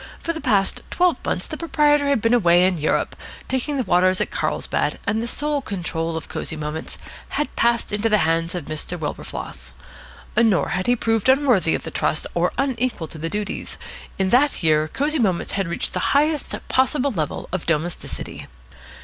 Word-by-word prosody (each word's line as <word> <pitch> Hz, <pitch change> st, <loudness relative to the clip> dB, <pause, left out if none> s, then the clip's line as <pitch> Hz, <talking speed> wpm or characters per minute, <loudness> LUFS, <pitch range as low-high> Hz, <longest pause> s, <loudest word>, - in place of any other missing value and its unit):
For 335 Hz, -, -2 dB
the 320 Hz, -, -6 dB
past 210 Hz, -8 st, +2 dB
twelve 360 Hz, -1 st, +2 dB
months -, -, -1 dB
the -, -, -6 dB
proprietor 295 Hz, -3 st, +3 dB
had 275 Hz, -6 st, +2 dB
been 230 Hz, +1 st, +3 dB
away 175 Hz, -6 st, +5 dB
in 185 Hz, -3 st, +1 dB
Europe, 150 Hz, -, 0 dB, 0.3 s
taking 265 Hz, +3 st, -1 dB
the 260 Hz, -, +1 dB
waters 185 Hz, -1 st, +3 dB
at -, -, 0 dB
Carlsbad, -, -, -1 dB
and 215 Hz, +2 st, 0 dB
the 235 Hz, -, -3 dB
sole 295 Hz, +3 st, 0 dB
control 165 Hz, -6 st, -2 dB
of 160 Hz, -, -6 dB
Cosy 160 Hz, -, -4 dB
Moments 155 Hz, +1 st, -5 dB, 0.4 s
had 295 Hz, -, -2 dB
passed 235 Hz, -2 st, +1 dB
into 210 Hz, +2 st, +1 dB
the 210 Hz, -, +5 dB
hands 165 Hz, +2 st, 0 dB
of 175 Hz, -5 st, -4 dB
Mr. 155 Hz, +4 st, -4 dB
Wilberfloss. 150 Hz, -3 st, -6 dB, 0.6 s
Nor 225 Hz, -6 st, +3 dB
had 185 Hz, +1 st, -1 dB
he 245 Hz, -, +4 dB
proved 225 Hz, 0 st, +1 dB
unworthy 255 Hz, -, +4 dB
of -, -, -4 dB
the -, -, -6 dB
trust 155 Hz, -, 0 dB
or 175 Hz, +1 st, +1 dB
unequal 255 Hz, -, -1 dB
to 160 Hz, -, -8 dB
the 165 Hz, +2 st, -2 dB
duties. 210 Hz, +2 st, -4 dB, 0.4 s
In 190 Hz, -1 st, +1 dB
that 260 Hz, -3 st, +3 dB
year 155 Hz, -1 st, +3 dB
Cosy 295 Hz, -, 0 dB
Moments 190 Hz, -7 st, +1 dB
had 195 Hz, -2 st, -1 dB
reached 170 Hz, -, -2 dB
the -, -, -1 dB, 0.2 s
highest 300 Hz, 0 st, +1 dB
possible 265 Hz, +1 st, +2 dB
level 160 Hz, -, -3 dB
of 185 Hz, -1 st, -3 dB
domesticity. 165 Hz, +1 st, -2 dB
205 Hz, 185 wpm, -22 LUFS, 170-265 Hz, 0.6 s, away